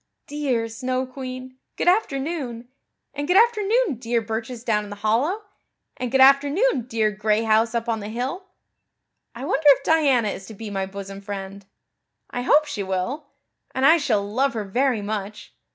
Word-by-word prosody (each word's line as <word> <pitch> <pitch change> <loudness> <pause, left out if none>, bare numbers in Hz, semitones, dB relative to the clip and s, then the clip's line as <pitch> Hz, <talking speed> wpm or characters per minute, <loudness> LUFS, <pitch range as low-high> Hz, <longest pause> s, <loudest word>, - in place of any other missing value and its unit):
"Dear 270 -6 -1
Snow 255 +3 -2
Queen, 255 0 -8 0.2
good - - -2
afternoon. 275 - 0 0.4
And 290 +1 -4
good 360 +2 +4
afternoon 445 - +3
dear 235 -1 0
birches 225 +2 -5
down 215 -3 +1
in 205 - -9
the 205 - -6
hollow. 240 - 0 0.5
And 250 -2 -4
good 265 - +2
afternoon, 275 - +4
dear 220 -3 +1
gray 210 +1 0
house 225 +1 +2
up 230 0 -1
on 225 -1 0
the 205 0 -6
hill. 260 - -4 0.9
I 250 +3 -6
wonder 295 +1 +1
if 275 -1 +5
Diana 275 -9 +3
is 195 - -7
to 220 - -10
be 215 0 -7
my 195 -1 -2
bosom 195 0 -8
friend. 200 -1 -7 0.6
I 245 - -3
hope 295 +4 +4
she 230 -8 -4
will, 195 +11 -3 0.5
and 260 - +2
I 320 +4 +7
shall 225 -10 +1
love 260 +5 0
her 215 - -2
very 240 +2 0
much. 210 0 -5
245 Hz, 170 wpm, -23 LUFS, 215-280 Hz, 0.9 s, I